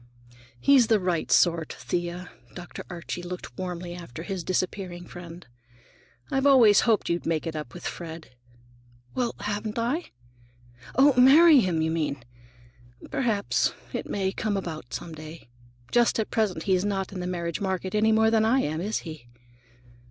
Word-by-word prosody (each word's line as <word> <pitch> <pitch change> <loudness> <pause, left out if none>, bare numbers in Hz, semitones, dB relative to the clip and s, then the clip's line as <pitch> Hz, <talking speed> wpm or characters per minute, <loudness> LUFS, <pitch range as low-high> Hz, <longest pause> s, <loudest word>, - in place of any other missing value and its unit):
"He's 265 - +5
the 220 -2 +4
right 180 -3 -1
sort, 165 -3 +3
Thea." 175 0 -4 0.2
Dr. 175 -1 -8
Archie 175 0 -6
looked 180 +1 -7
warmly 180 -1 -5
after 165 -4 -8
his 185 -1 -4
disappearing 180 0 -3
friend. 175 0 -10 0.9
"I've 270 +1 +2
always 235 -7 +7
hoped 220 - +2
you'd 170 0 -1
make 165 -1 0
it 165 -1 -4
up 150 -3 -6
with 175 - -9
Fred." 165 -3 -7 0.8
"Well, 245 -2 -1
haven't 210 +1 -3
I? 250 +9 -1 0.9
Oh, 275 +2 +6
marry 300 +3 +8
him, 175 -7 +1
you 160 - 0
mean! 150 -5 -2 0.9
Perhaps 220 -6 +1 0.2
it - - -4
may 190 -1 -1
come 210 0 -2
about, 155 -9 -6
some 165 - -6
day. 155 -3 -11 0.4
Just 240 -1 +3
at 220 - -2
present 195 -7 0
he's 185 -2 +2
not 195 -2 -2
in 185 - -5
the 180 - -3
marriage 170 -1 -3
market 190 -1 -2
any 215 +1 +3
more 220 0 +4
than 220 -1 +3
I 245 +5 +3
am, 155 +2 -2
is 210 +4 -2
he?" 155 -7 -9
180 Hz, 160 wpm, -26 LUFS, 170-220 Hz, 0.9 s, marry